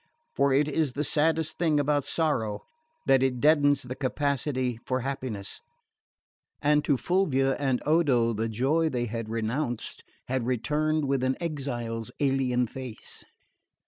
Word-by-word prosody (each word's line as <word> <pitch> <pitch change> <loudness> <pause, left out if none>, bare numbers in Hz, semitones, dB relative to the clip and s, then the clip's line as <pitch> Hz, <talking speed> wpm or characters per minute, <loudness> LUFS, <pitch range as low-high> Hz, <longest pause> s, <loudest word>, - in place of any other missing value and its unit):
For 140 0 +3
it 140 +2 +3
is 150 -3 0
the 145 - -1
saddest 160 +2 +1
thing 160 -4 +3
about 145 0 +1
sorrow 110 -11 -1 0.4
that 135 -1 +4
it 130 -2 +1
deadens 145 0 +4
the 125 0 -5
capacity 130 -2 -1
for 130 0 -1
happiness; 125 -7 -5 1.0
and 150 0 +3
to 140 - +3
Fulvia 135 -6 +1
and 135 -3 0
Odo 140 -8 +3
the 110 +1 -2
joy 140 +9 +1
they 125 -4 -1
had 115 -1 -4
renounced 115 +2 -3 0.2
had 125 -2 -1
returned 150 +5 0
with 135 -1 0
an 130 0 +1
exile's 120 -8 -3
alien 130 -3 +2
face. 125 -1 -7
135 Hz, 140 wpm, -27 LUFS, 125-150 Hz, 1.0 s, that